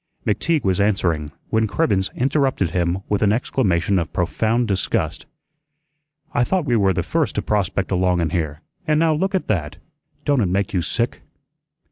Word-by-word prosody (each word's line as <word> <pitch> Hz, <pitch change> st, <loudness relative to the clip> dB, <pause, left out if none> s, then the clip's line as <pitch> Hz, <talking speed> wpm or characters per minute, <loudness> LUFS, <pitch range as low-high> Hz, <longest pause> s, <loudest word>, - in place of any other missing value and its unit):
McTeague 145 Hz, +8 st, +1 dB
was 95 Hz, 0 st, +1 dB
answering, 85 Hz, -7 st, 0 dB, 0.2 s
when 110 Hz, 0 st, +2 dB
Cribbens 100 Hz, -8 st, +1 dB
interrupted 130 Hz, -, +1 dB
him 90 Hz, +2 st, 0 dB
with 105 Hz, -, 0 dB
an 105 Hz, -2 st, +4 dB
exclamation 100 Hz, -6 st, +1 dB
of 85 Hz, -, -4 dB
profound 110 Hz, +7 st, 0 dB
disgust. 95 Hz, -3 st, -1 dB, 1.1 s
"I 120 Hz, -, +3 dB
thought 180 Hz, +4 st, 0 dB
we 120 Hz, -4 st, +2 dB
were 100 Hz, -3 st, +3 dB
the 90 Hz, -, -1 dB
first -, -, -1 dB
to -, -, -1 dB
prospect 100 Hz, -2 st, -1 dB
along 90 Hz, -1 st, +2 dB
in 80 Hz, -2 st, 0 dB
here, 80 Hz, -2 st, -2 dB, 0.3 s
an' 155 Hz, -1 st, +3 dB
now 160 Hz, 0 st, +3 dB
look 190 Hz, +6 st, 0 dB
at 185 Hz, -, 0 dB
that. 80 Hz, -8 st, -1 dB, 0.5 s
Don't 140 Hz, -4 st, +3 dB
it 100 Hz, -, +2 dB
make 95 Hz, +2 st, -1 dB
you 90 Hz, -, +1 dB
sick?" -, -, -2 dB
100 Hz, 170 wpm, -21 LUFS, 90-125 Hz, 1.1 s, an